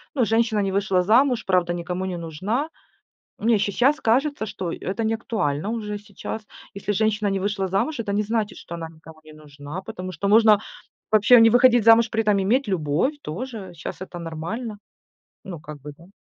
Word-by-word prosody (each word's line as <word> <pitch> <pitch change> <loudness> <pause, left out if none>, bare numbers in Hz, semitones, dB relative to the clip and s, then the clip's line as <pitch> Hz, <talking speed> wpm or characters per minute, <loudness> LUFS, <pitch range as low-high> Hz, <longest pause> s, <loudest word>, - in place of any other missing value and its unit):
ну, 255 -4 +2
женщина 225 0 +1
не 195 -1 -1
вышла 195 -2 +2
замуж, 235 +5 +3
правда 180 -2 +2
никому 175 +1 -4
не 185 -2 -4
нужна. 190 - -3 0.7
Мне 225 +1 +3
сейчас 245 +9 +2
кажется, 265 +1 +1
что 190 -4 -5
это 195 +6 -4
неактуально 215 -8 -1
уже 210 -2 -3
сейчас. 210 +1 -7 0.3
Если 200 +1 -3
женщина 215 0 +1
не 195 -1 0
вышла 195 0 -1
замуж, 195 - -1
это 205 -3 -2
не 205 - +1
значит, 215 0 -2
что 170 - -8
она 165 -1 -6
никому 160 0 -15
не 155 - -13
нужна, 150 +2 -9
потому 185 -1 -7
что 185 +4 -3
можно 215 0 +6 0.5
вообще 215 +3 +6
не 225 - +7
выходить 245 0 +5
замуж 230 +1 +6
при 225 - +1
этом 210 -2 +2
иметь 230 +7 +1
любовь 170 - 0
тоже, 205 +1 -6
щас 165 - -8
это 185 -2 -7
нормально. 170 +8 -5 0.7
Ну 185 -4 -7
как 150 -2 -10
бы 150 - -8
да. 170 - -16
205 Hz, 180 wpm, -23 LUFS, 175-225 Hz, 0.7 s, не